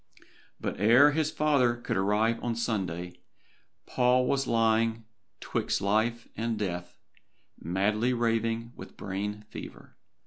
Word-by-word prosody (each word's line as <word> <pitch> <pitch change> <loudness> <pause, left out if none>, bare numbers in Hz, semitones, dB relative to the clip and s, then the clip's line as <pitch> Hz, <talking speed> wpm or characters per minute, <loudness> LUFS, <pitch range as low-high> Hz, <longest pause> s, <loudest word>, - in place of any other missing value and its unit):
But - - -4
ere 120 +8 +6
his 155 0 0
father 140 -7 +2
could 120 +1 -4
arrive 105 +4 +1
on 120 -1 -1
Sunday, 95 -7 -3 0.7
Paul 125 0 +2
was 135 +1 0
lying 115 0 +1 0.3
'twixt - - -1
life 110 +4 0
and 115 0 -2
death, 90 -4 -4 0.6
madly 105 +8 0
raving 115 -1 0
with - - -11
brain 105 +2 -4
fever. - - -10
115 Hz, 115 wpm, -28 LUFS, 105-120 Hz, 0.7 s, ere